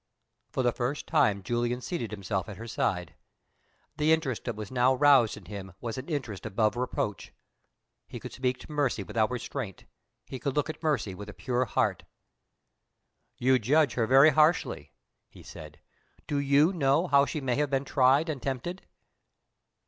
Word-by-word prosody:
For 130 Hz, -, -2 dB
the 120 Hz, -, +3 dB
first 125 Hz, +5 st, -3 dB
time 100 Hz, -2 st, +2 dB
Julian 120 Hz, +3 st, -1 dB
seated 125 Hz, -, -4 dB
himself 100 Hz, -3 st, -3 dB
at 100 Hz, -, -8 dB
her 115 Hz, +2 st, -8 dB
side. 90 Hz, -7 st, -2 dB, 0.8 s
The 150 Hz, +1 st, +2 dB
interest 155 Hz, -7 st, 0 dB
that 120 Hz, -, -3 dB
was 105 Hz, +1 st, -7 dB
now 130 Hz, +1 st, +3 dB
roused 135 Hz, -5 st, +5 dB
in -, -, -13 dB
him 95 Hz, -3 st, -8 dB
was 115 Hz, -2 st, -4 dB
an 130 Hz, +5 st, -7 dB
interest 130 Hz, -, -4 dB
above 110 Hz, +1 st, 0 dB
reproach. 120 Hz, -4 st, -3 dB, 0.8 s
He -, -, -8 dB
could -, -, -8 dB
speak 125 Hz, -1 st, -1 dB
to -, -, -12 dB
Mercy 140 Hz, -8 st, 0 dB
without 110 Hz, +2 st, 0 dB
restraint; 125 Hz, -3 st, -5 dB, 0.4 s
he 130 Hz, -, -7 dB
could 135 Hz, +2 st, -3 dB
look 150 Hz, +1 st, 0 dB
at -, -, -16 dB
Mercy 150 Hz, -, 0 dB
with 100 Hz, +3 st, -9 dB
a -, -, -8 dB
pure 125 Hz, 0 st, -1 dB
heart. 115 Hz, -, 0 dB, 1.4 s
"You 130 Hz, +1 st, +3 dB
judge 140 Hz, +4 st, +3 dB
her 115 Hz, -3 st, 0 dB
very 135 Hz, +5 st, +7 dB
harshly," 155 Hz, +3 st, +2 dB, 0.4 s
he -, -, -15 dB
said. 75 Hz, -1 st, -11 dB, 0.5 s
"Do 145 Hz, -, -1 dB
you 140 Hz, +5 st, +3 dB
know 145 Hz, 0 st, +2 dB
how 140 Hz, -4 st, +4 dB
she 155 Hz, -, -3 dB
may 125 Hz, -4 st, -1 dB
have 145 Hz, -1 st, +1 dB
been 135 Hz, 0 st, 0 dB
tried 135 Hz, +4 st, +3 dB
and 150 Hz, -5 st, -4 dB
tempted?" 140 Hz, +8 st, -4 dB
130 Hz, 170 wpm, -28 LUFS, 110-145 Hz, 1.4 s, very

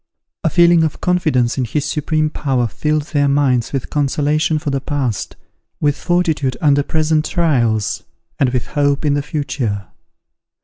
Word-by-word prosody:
A -, -, +2 dB
feeling 170 Hz, -1 st, +5 dB
of 160 Hz, -, -2 dB
confidence 150 Hz, -9 st, +1 dB
in -, -, +1 dB
his 145 Hz, +4 st, -2 dB
supreme 155 Hz, 0 st, 0 dB
power 130 Hz, -6 st, 0 dB
filled 150 Hz, +6 st, -1 dB
their 145 Hz, -1 st, +3 dB
minds 135 Hz, -4 st, +1 dB
with 135 Hz, -3 st, -4 dB
consolation 150 Hz, +2 st, +1 dB
for 150 Hz, -1 st, -3 dB
the 135 Hz, -1 st, -1 dB
past, 130 Hz, -7 st, -3 dB, 0.4 s
with 145 Hz, -1 st, +1 dB
fortitude 160 Hz, -8 st, 0 dB
under 145 Hz, -2 st, +3 dB
present 155 Hz, +1 st, +1 dB
trials, 120 Hz, -, +1 dB, 0.4 s
and 135 Hz, -, +3 dB
with 125 Hz, -1 st, -2 dB
hope 145 Hz, 0 st, +1 dB
in 145 Hz, -, +3 dB
the 145 Hz, -, +1 dB
future. 125 Hz, -, -3 dB
145 Hz, 150 wpm, -18 LUFS, 130-155 Hz, 0.4 s, feeling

